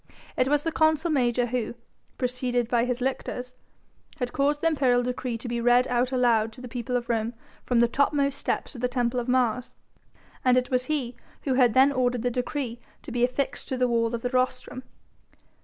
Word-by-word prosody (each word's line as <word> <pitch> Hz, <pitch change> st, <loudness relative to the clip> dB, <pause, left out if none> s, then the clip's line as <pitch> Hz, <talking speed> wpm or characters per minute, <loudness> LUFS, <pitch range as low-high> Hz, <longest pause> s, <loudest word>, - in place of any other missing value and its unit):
It 255 Hz, -, +2 dB
was 295 Hz, +1 st, +2 dB
the 330 Hz, -, -1 dB
consul 315 Hz, +1 st, +2 dB
major 245 Hz, -4 st, +2 dB
who, 240 Hz, -1 st, -3 dB, 0.4 s
preceded 250 Hz, -1 st, -1 dB
by 235 Hz, 0 st, +2 dB
his 250 Hz, 0 st, -2 dB
lictors, 250 Hz, -1 st, -3 dB, 0.6 s
had 245 Hz, -1 st, -3 dB
caused 290 Hz, +1 st, +1 dB
the -, -, -2 dB
imperial 260 Hz, -6 st, +2 dB
decree 250 Hz, -1 st, -3 dB
to 235 Hz, -, -8 dB
be 235 Hz, 0 st, -2 dB
read 245 Hz, +1 st, +4 dB
out 250 Hz, +1 st, +1 dB
aloud 235 Hz, -4 st, +2 dB
to 250 Hz, -, -12 dB
the 250 Hz, -, -7 dB
people 245 Hz, +1 st, -4 dB
of 240 Hz, -1 st, -5 dB
Rome 230 Hz, 0 st, -1 dB, 0.3 s
from 240 Hz, -2 st, +3 dB
the 235 Hz, -, +5 dB
topmost 280 Hz, +2 st, +1 dB
steps -, -, -2 dB
of 245 Hz, -, -9 dB
the 250 Hz, -, +2 dB
Temple 245 Hz, 0 st, 0 dB
of 240 Hz, -, -4 dB
Mars, 250 Hz, -1 st, 0 dB, 0.7 s
and 255 Hz, -1 st, +4 dB
it 250 Hz, +1 st, 0 dB
was 255 Hz, 0 st, +1 dB
he 260 Hz, -5 st, -2 dB, 0.3 s
who 270 Hz, -, 0 dB
had 250 Hz, -3 st, +4 dB
then 265 Hz, +2 st, +6 dB
ordered 250 Hz, -3 st, 0 dB
the 245 Hz, -, +1 dB
decree 250 Hz, -1 st, -3 dB, 0.2 s
to -, -, -8 dB
be 245 Hz, 0 st, 0 dB
affixed 255 Hz, +2 st, -1 dB
to 260 Hz, -, -2 dB
the 250 Hz, 0 st, +2 dB
wall 230 Hz, -1 st, +1 dB
of 230 Hz, -, -6 dB
the 245 Hz, -, 0 dB
rostrum. 255 Hz, 0 st, -1 dB
250 Hz, 205 wpm, -26 LUFS, 240-260 Hz, 0.7 s, then